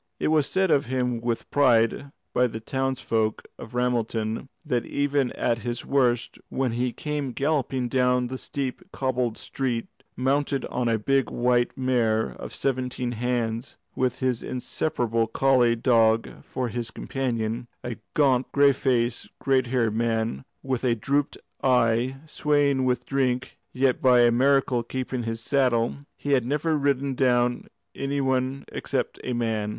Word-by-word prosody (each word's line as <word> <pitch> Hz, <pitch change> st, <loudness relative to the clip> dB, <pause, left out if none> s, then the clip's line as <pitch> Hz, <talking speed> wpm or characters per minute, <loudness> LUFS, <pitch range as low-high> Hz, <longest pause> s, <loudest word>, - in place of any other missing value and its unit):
It -, -, +1 dB
was 155 Hz, -3 st, +3 dB
said 190 Hz, -2 st, +1 dB
of 140 Hz, -4 st, +3 dB
him 125 Hz, -2 st, -1 dB
with 120 Hz, -1 st, -2 dB
pride 130 Hz, 0 st, +3 dB, 0.2 s
by 125 Hz, 0 st, +3 dB
the 110 Hz, -1 st, -6 dB
townsfolk 115 Hz, -3 st, -1 dB, 0.2 s
of 115 Hz, +2 st, -9 dB
Ramelton, 115 Hz, -1 st, -1 dB, 0.2 s
that 120 Hz, -2 st, 0 dB
even 140 Hz, -1 st, 0 dB
at 120 Hz, -1 st, 0 dB
his 120 Hz, +1 st, -4 dB
worst, 125 Hz, -4 st, +1 dB
when 130 Hz, -2 st, -1 dB
he 120 Hz, +2 st, -1 dB
came 145 Hz, -1 st, -3 dB
galloping 135 Hz, -3 st, 0 dB
down 125 Hz, 0 st, +2 dB
the 130 Hz, +1 st, -5 dB
steep 135 Hz, 0 st, -4 dB
cobbled 125 Hz, -3 st, -1 dB
streets, 125 Hz, -4 st, -3 dB, 0.3 s
mounted 135 Hz, +1 st, 0 dB
on 125 Hz, -1 st, 0 dB
a 115 Hz, -, +2 dB
big 135 Hz, +5 st, +1 dB
white 120 Hz, 0 st, +1 dB
mare 120 Hz, -4 st, +1 dB
of -, -, -7 dB
seventeen 125 Hz, -2 st, -2 dB
hands, 120 Hz, 0 st, -2 dB, 0.2 s
with 130 Hz, 0 st, 0 dB
his 125 Hz, -3 st, 0 dB
inseparable 120 Hz, -3 st, -1 dB
collie 125 Hz, 0 st, +3 dB
dog 115 Hz, -2 st, +2 dB
for 125 Hz, -2 st, -3 dB
his 120 Hz, 0 st, -3 dB
companion, 120 Hz, -2 st, -3 dB, 0.2 s
a 120 Hz, -2 st, -4 dB, 0.2 s
gaunt, 135 Hz, -4 st, +3 dB
grey 140 Hz, 0 st, +5 dB
faced, 120 Hz, -3 st, 0 dB
grey 135 Hz, -1 st, +2 dB
haired 120 Hz, -3 st, +1 dB
man, 110 Hz, -9 st, 0 dB, 0.2 s
with 130 Hz, -2 st, -2 dB
a 120 Hz, -2 st, +2 dB
drooping 140 Hz, +5 st, -1 dB, 0.2 s
eye, 125 Hz, 0 st, +2 dB
swaying 145 Hz, -3 st, +1 dB
with 125 Hz, -1 st, 0 dB
drink, 130 Hz, -2 st, -1 dB, 0.2 s
yet 130 Hz, 0 st, +1 dB
by 125 Hz, -2 st, +6 dB
a 120 Hz, 0 st, +5 dB
miracle 130 Hz, 0 st, +3 dB
keeping 130 Hz, +1 st, -4 dB
his 115 Hz, 0 st, -3 dB
saddle, 125 Hz, -3 st, +1 dB, 0.2 s
he 145 Hz, -, -3 dB
had 130 Hz, -3 st, +4 dB
never 150 Hz, +3 st, +1 dB
ridden 140 Hz, -1 st, +1 dB
down 125 Hz, -2 st, +1 dB, 0.3 s
any 140 Hz, +1 st, -2 dB
one 130 Hz, 0 st, 0 dB
except -, -, -3 dB
a 125 Hz, -, -2 dB
man. 110 Hz, -3 st, -1 dB
125 Hz, 150 wpm, -25 LUFS, 120-135 Hz, 0.3 s, by